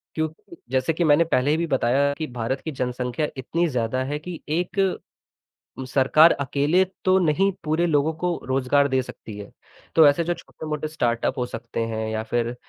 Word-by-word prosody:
क्योंकि 160 - -5
जैसे 130 +4 +1
कि 170 +2 -1
मैंने 155 +2 +5
पहले 145 0 +2
भी 170 0 -1
बताया 135 +1 +2
कि 155 - -2
भारत 120 +4 -2
की 160 - -3
जनसंख्या 125 +2 -2
इतनी 170 +7 -1
ज़्यादा 125 -1 -1
है 145 +2 -3
कि 170 +2 -8
एक 175 +4 -2 1.0
उम, 130 - -5
सरकार 140 +5 +5
अकेले 145 +6 +2 0.2
तो 185 0 +5
नहीं 185 +3 +2
पूरे 160 +3 +1
लोगों 150 0 +2
को 175 -1 0
रोज़गार 135 +2 +2
दे 130 -1 +2
सकती 110 -4 -10
है। 100 - -9 0.4
तो 160 -2 +8
ऐसे 145 +4 +3
जो 175 - 0
छोटे-मोटे 155 -2 -6
स्टार्टअप 125 -3 -1
हो 125 - 0
सकते 115 -1 -6
हैं 110 0 -2
या 110 0 -2
फिर 120 0 0
145 Hz, 180 wpm, -24 LUFS, 125-160 Hz, 1.0 s, तो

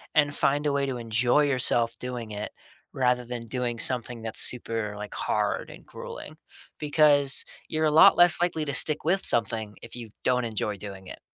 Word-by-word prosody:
and 145 -1 +3
find 145 +2 +1
a 145 - +2
way 140 0 0
to 130 -2 -3
enjoy 120 +4 +1
yourself 120 -4 +1
doing 125 -3 -6
it 105 0 -5 0.4
rather 125 -1 +1
than 120 0 -5
doing 120 0 -3
something 120 -1 0
that's 110 -1 -1
super, 115 -4 +1
like, 105 0 -7
hard 105 -1 -1
and - - -13
grueling. - - -9 0.4
Because 145 -2 +3 0.2
you're 155 0 -1
a 155 - +2
lot 155 - +7
less 175 0 +6
likely 170 -3 0
to 140 - -3
stick 155 +2 +1
with 190 +5 0
something 110 -2 -1
if - - -11
you 120 -2 -8
don't 125 -1 +1
enjoy 105 -2 -3
doing 95 -1 -9
it. - - -10
125 Hz, 185 wpm, -26 LUFS, 115-145 Hz, 0.4 s, lot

